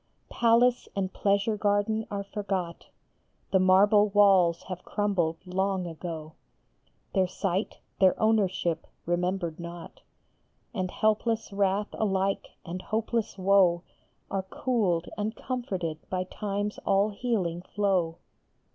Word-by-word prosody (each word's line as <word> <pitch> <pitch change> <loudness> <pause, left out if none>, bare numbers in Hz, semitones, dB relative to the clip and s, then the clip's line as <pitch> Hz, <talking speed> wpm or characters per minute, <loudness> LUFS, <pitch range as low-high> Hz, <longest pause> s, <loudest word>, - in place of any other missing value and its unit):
Palace 240 +1 +3
and 190 -1 -2
pleasure 200 +2 +1
garden 205 +1 +1
are 200 -1 -3
forgot; 195 -4 -4 0.6
The 190 - +4
marble 205 +3 +5
walls 195 -4 +4
have 185 -1 -7
crumbled 185 -6 0
long 190 0 -1
ago; 160 -2 -6 0.8
Their 190 -2 +3
site, 190 +2 -2 0.2
their 190 -2 +4
ownership, 190 -6 +1 0.2
remembered 175 -1 -1
not, 170 0 -9 0.7
And 185 -4 -2
helpless 215 +1 0
wrath 200 +1 +1
alike 195 -2 0 0.2
and 180 +2 -5
hopeless 225 +1 -2
woe 185 -2 +4 0.5
Are 195 - 0
cooled 190 -4 0
and 215 +2 -2
comforted 190 -13 -3
by 185 -1 -1
Time 205 +2 -3
s - - -13
all 200 +1 +2
healing 200 -7 -1
flow. 185 -4 0
195 Hz, 115 wpm, -28 LUFS, 180-210 Hz, 0.8 s, marble